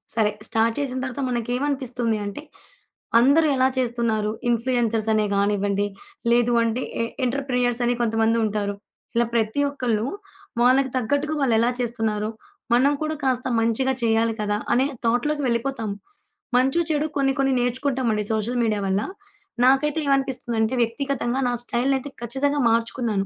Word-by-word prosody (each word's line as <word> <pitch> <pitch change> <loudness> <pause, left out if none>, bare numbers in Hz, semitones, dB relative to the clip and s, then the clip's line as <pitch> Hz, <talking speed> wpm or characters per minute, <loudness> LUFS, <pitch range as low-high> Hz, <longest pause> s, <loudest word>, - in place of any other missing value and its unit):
సరే, 215 -2 +2 0.2
స్టార్ట్ 225 +1 +1
చేసిన 265 -3 -2
తర్వాత 265 +1 -3
మనకేమనిపిస్తుందీ 245 -1 -1
అంటే, 205 +9 -6 0.8
అందరూ 285 +6 +5
ఎలా 260 0 +4
చేస్తున్నారు? 235 -4 0 0.2
ఇన్‌ఫ్లూయెన్సర్స్ 230 -2 +1
అనే 215 -1 +2
గానివ్వండి, 200 0 +1 0.5
లేదు 240 0 +3
అంటే 230 +3 -1 0.2
ఎ - - 0 0.2
ఎంటర్‌ప్రెన్యూర్స్ 250 -2 0
అని 245 0 +2
కొంతమందుంటారు. 220 -2 +1 0.4
ఇలా 235 -1 +3
ప్రతి 220 +4 +1
ఒక్కళ్ళు 240 -5 -1 0.6
వాళ్ళకి 265 +2 +4
తగ్గట్టుగా 285 +5 0
వాళ్ళెలా 235 -2 +3
చేస్తున్నారు? 220 -3 -1 0.4
మనం 265 +4 +4
కూడా 310 0 -2
కాస్త 255 -1 0
మంచిగా 230 +4 +1
చేయాలి 225 0 +2
కదా! 205 0 0 0.2
అనే 260 +3 +3 0.2
థాట్‌లోకి 285 +6 +1
వెళ్ళిపోతాం. 235 -2 -1 0.7
మంచో‌, 270 +7 +3
చెడో 300 +1 +1
కొన్ని 270 -1 +2
కొన్ని 270 -1 +2
నేర్చుకుంటామండి 245 -3 0
సోషల్ 235 +3 -1
మీడియా 210 -2 0
వల్ల. 190 +1 +1 0.6
నాకైతే 275 +4 +3
ఏమనిపిస్తుందంటే 260 -4 0
వ్యక్తిగతంగా 250 +1 -1
నా 245 - 0
స్టైల్‌నైతే 265 +3 0
ఖచ్చితంగా 275 +5 -1
మార్చుకున్నాను. 230 -3 0
240 Hz, 125 wpm, -23 LUFS, 225-265 Hz, 0.8 s, అందరూ